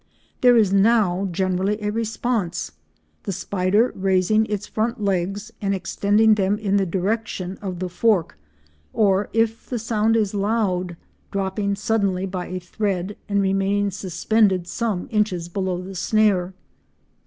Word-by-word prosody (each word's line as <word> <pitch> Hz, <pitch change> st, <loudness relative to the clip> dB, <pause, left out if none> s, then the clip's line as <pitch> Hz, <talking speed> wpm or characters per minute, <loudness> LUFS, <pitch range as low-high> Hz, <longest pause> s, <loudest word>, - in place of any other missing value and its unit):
There 245 Hz, -1 st, +6 dB
is 205 Hz, -4 st, +3 dB
now 200 Hz, -2 st, +3 dB
generally 190 Hz, +3 st, 0 dB
a 210 Hz, -1 st, -2 dB
response, 225 Hz, -4 st, -2 dB, 0.5 s
the -, -, -4 dB
spider 195 Hz, +5 st, +1 dB
raising 195 Hz, +3 st, +2 dB
its 205 Hz, -1 st, -3 dB
front 230 Hz, +2 st, -2 dB
legs 200 Hz, +1 st, -1 dB
and 200 Hz, -1 st, 0 dB
extending 205 Hz, +4 st, +3 dB
them 200 Hz, 0 st, +1 dB
in 200 Hz, -2 st, 0 dB
the 195 Hz, -1 st, +1 dB
direction 190 Hz, 0 st, -2 dB
of 190 Hz, -3 st, -4 dB
the 185 Hz, +1 st, -3 dB
fork, 185 Hz, -, +1 dB, 0.6 s
or, 200 Hz, -1 st, +2 dB
if 225 Hz, 0 st, 0 dB
the 245 Hz, -, -2 dB
sound 225 Hz, 0 st, +1 dB
is 215 Hz, -3 st, +1 dB
loud, 195 Hz, -4 st, 0 dB, 0.3 s
dropping 200 Hz, +1 st, -1 dB
suddenly 200 Hz, -3 st, 0 dB
by 185 Hz, -2 st, -4 dB
a 185 Hz, -, -4 dB
thread 190 Hz, +1 st, -3 dB
and 200 Hz, -1 st, +2 dB
remaining 195 Hz, +1 st, +1 dB
suspended 190 Hz, +1 st, +1 dB
some 195 Hz, 0 st, -2 dB
inches 205 Hz, -6 st, 0 dB
below 185 Hz, -1 st, -2 dB
the 195 Hz, +1 st, -8 dB
snare. 190 Hz, -1 st, +1 dB
200 Hz, 140 wpm, -22 LUFS, 185-215 Hz, 0.6 s, There